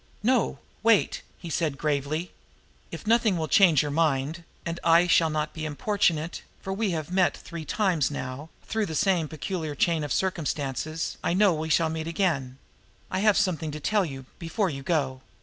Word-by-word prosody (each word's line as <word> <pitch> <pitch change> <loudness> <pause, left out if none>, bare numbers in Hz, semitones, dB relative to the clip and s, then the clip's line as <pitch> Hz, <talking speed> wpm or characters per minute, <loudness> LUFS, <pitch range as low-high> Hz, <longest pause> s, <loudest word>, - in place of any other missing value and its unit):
"No! 250 +1 +2 0.2
Wait!" 225 -2 +3 0.2
he 170 - -8
said 155 -3 0
gravely. 150 +3 -1 0.6
"If - - -7
nothing 225 -3 +3
will 160 -1 -1
change 170 -8 +5
your 145 - -3
mind 155 +1 0 0.2
and 170 0 -3
I 170 +1 +6
shall 170 -2 +4
not 155 0 -2
be 160 - -6
importunate, 160 +1 0 0.2
for, 190 - -4
as - - -5
we 220 -3 +1
have 160 -2 -3
met 185 -1 +2
three 170 -2 -8
times 180 -6 +1
now 145 +1 -6
through 220 -2 -1
the 160 - -4
same 180 -3 +2
peculiar 155 +1 -4
chain 165 +1 +1
of 145 - -4
circumstances, 155 -3 -2
I 170 - +1
know 200 -1 +5
we 160 0 -3
shall 160 +1 +3
meet 160 0 -4
again 160 -8 -1 0.5
I 185 - 0
have 210 0 +4
something 175 -7 0
to 150 +1 -5
tell 210 +6 +2
you, 135 -6 -6
before 180 +3 -1
you 135 -1 -6
go. 135 -4 -1
165 Hz, 185 wpm, -27 LUFS, 150-185 Hz, 0.6 s, I